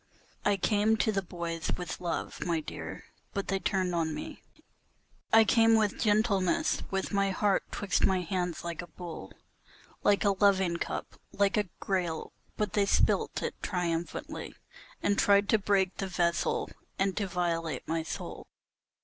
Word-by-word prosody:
I 205 Hz, -1 st, +3 dB
came 210 Hz, +3 st, +2 dB
to 220 Hz, -, +2 dB
the 195 Hz, -2 st, 0 dB
boys 170 Hz, -2 st, -4 dB
with 180 Hz, -1 st, -5 dB
love, 170 Hz, -2 st, -3 dB
my 170 Hz, -2 st, 0 dB
dear, 155 Hz, -, -7 dB, 0.3 s
but 200 Hz, -, -2 dB
they 195 Hz, -, +1 dB
turned 185 Hz, 0 st, 0 dB
on 160 Hz, -2 st, 0 dB
me; -, -, -7 dB, 0.9 s
I 225 Hz, 0 st, +8 dB
came 225 Hz, 0 st, +5 dB
with 215 Hz, -2 st, +1 dB
gentleness, 205 Hz, -4 st, +2 dB
with 195 Hz, +1 st, -2 dB
my 200 Hz, 0 st, +2 dB
heart 195 Hz, +1 st, +2 dB
'twixt 205 Hz, -, -1 dB
my 190 Hz, -1 st, +3 dB
hands 175 Hz, -1 st, -2 dB
like 170 Hz, -1 st, -4 dB
a 175 Hz, -, -9 dB
bowl, 165 Hz, -, -8 dB, 0.7 s
Like 205 Hz, 0 st, +3 dB
a 200 Hz, -, +5 dB
loving 190 Hz, -3 st, +3 dB
cup, -, -, -5 dB
like 200 Hz, -1 st, +2 dB
a 210 Hz, -4 st, 0 dB
grail, 175 Hz, -5 st, -2 dB, 0.2 s
but 210 Hz, -3 st, -1 dB
they 200 Hz, -1 st, +2 dB
spilt -, -, +2 dB
it -, -, -1 dB
triumphantly 175 Hz, -2 st, -3 dB, 0.5 s
And 205 Hz, 0 st, +2 dB
tried 200 Hz, 0 st, +5 dB
to 220 Hz, -, +4 dB
break 195 Hz, -2 st, +2 dB
the 195 Hz, -, -2 dB
vessel, 170 Hz, -2 st, 0 dB, 0.3 s
and 195 Hz, 0 st, +1 dB
to 205 Hz, -2 st, 0 dB
violate 165 Hz, -6 st, -2 dB
my 165 Hz, 0 st, 0 dB
soul. 160 Hz, -, -6 dB
190 Hz, 160 wpm, -30 LUFS, 170-205 Hz, 0.9 s, I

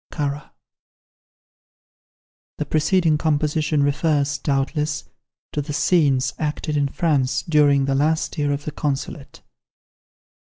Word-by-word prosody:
[The 150 Hz, -, -2 dB
preceding 155 Hz, 0 st, +2 dB
composition 150 Hz, -1 st, +1 dB
refers, 145 Hz, 0 st, +1 dB
doubtless, 145 Hz, +1 st, -1 dB, 0.5 s
to 150 Hz, -, -2 dB
the 145 Hz, +1 st, -6 dB
scenes 140 Hz, -4 st, +2 dB
acted 150 Hz, 0 st, -2 dB
in 145 Hz, -1 st, +2 dB
France 135 Hz, -4 st, 0 dB
during 145 Hz, -3 st, +3 dB
the 135 Hz, -, 0 dB
last 155 Hz, +4 st, 0 dB
year 145 Hz, -3 st, 0 dB
of 145 Hz, +1 st, -3 dB
the 155 Hz, -, -3 dB
Consulate. 145 Hz, 0 st, -4 dB
150 Hz, 100 wpm, -22 LUFS, 140-155 Hz, 0.5 s, during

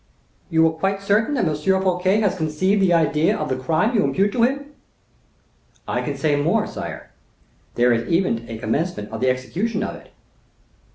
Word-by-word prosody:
"You 160 Hz, -1 st, +4 dB
are 160 Hz, -, +3 dB
quite 195 Hz, +5 st, -1 dB
certain 215 Hz, +8 st, +2 dB
that 240 Hz, -, +1 dB
M. 155 Hz, -, 0 dB
Fouquet 190 Hz, +4 st, +1 dB
has 205 Hz, -3 st, +1 dB
conceived 185 Hz, +5 st, 0 dB
the 190 Hz, -2 st, +3 dB
idea 160 Hz, -1 st, +2 dB
of 150 Hz, -, -3 dB
the 130 Hz, -, 0 dB
crime 160 Hz, -, 0 dB
you 210 Hz, -4 st, +3 dB
impute 200 Hz, +2 st, +1 dB
to 235 Hz, -, -1 dB
him?" 280 Hz, +4 st, 0 dB, 1.1 s
"I -, -, -1 dB
can -, -, -4 dB
say 150 Hz, -2 st, +1 dB
more, 145 Hz, 0 st, +1 dB
sire; -, -, -7 dB, 0.6 s
there 120 Hz, 0 st, +4 dB
is 115 Hz, 0 st, -2 dB
even 165 Hz, -10 st, 0 dB
a 115 Hz, -, -5 dB
commencement 115 Hz, -, -2 dB
of 110 Hz, -, -6 dB
the 130 Hz, -, +3 dB
execution 190 Hz, -, -2 dB
of -, -, -4 dB
it." -, -, -15 dB
170 Hz, 180 wpm, -21 LUFS, 145-200 Hz, 1.1 s, You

